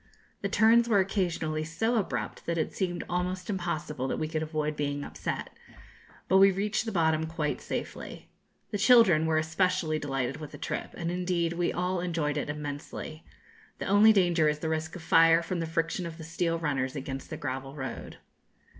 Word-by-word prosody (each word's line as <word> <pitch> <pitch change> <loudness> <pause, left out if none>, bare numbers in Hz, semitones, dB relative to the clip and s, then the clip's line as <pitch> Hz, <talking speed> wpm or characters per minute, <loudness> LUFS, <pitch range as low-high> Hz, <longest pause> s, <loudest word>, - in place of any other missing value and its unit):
The 200 - -1
turns 230 +3 +5
were 210 - +4
occasionally 175 -5 0
so 225 +9 -1
abrupt, 120 - -2
that 170 0 0
it 160 - -1
seemed 175 -3 -2
almost 180 +2 -2
impossible 155 -7 -3
that - - -2
we 155 - -1
could 155 0 -2
avoid 155 -1 -2
being 145 -1 -2
upset; - - -4 0.8
but 190 - +5
we 195 0 +8
reached 205 +3 -1
the - - -1
bottom 160 -3 +2
quite 160 -2 -2
safely. - - -6 0.4
The 205 - -2
children 200 -9 +6
were 160 -1 +2
especially 160 0 +1
delighted 135 -2 -2
with 155 -2 -9
the - - -7
trip, - - -4
and 170 0 -2
indeed 175 -2 0
we 175 0 0
all 180 +1 -1
enjoyed 165 -4 -1
it 145 - -2
immensely. 150 +2 -6 0.5
The - - -5
only 205 +3 +6
danger 175 -6 +3
is 150 - -1
the 160 +1 -3
risk 160 +1 -2
of 175 - -8
fire 165 +1 +5
from 175 +1 -3
the 165 - -2
friction 165 +2 -1
of 165 -1 -8
the 165 - -8
steel 165 +1 -1
runners 140 -4 -1
against 135 -1 -5
the 160 - -5
gravel 135 -2 -5
road. 130 -4 -6
165 Hz, 185 wpm, -29 LUFS, 150-180 Hz, 0.8 s, we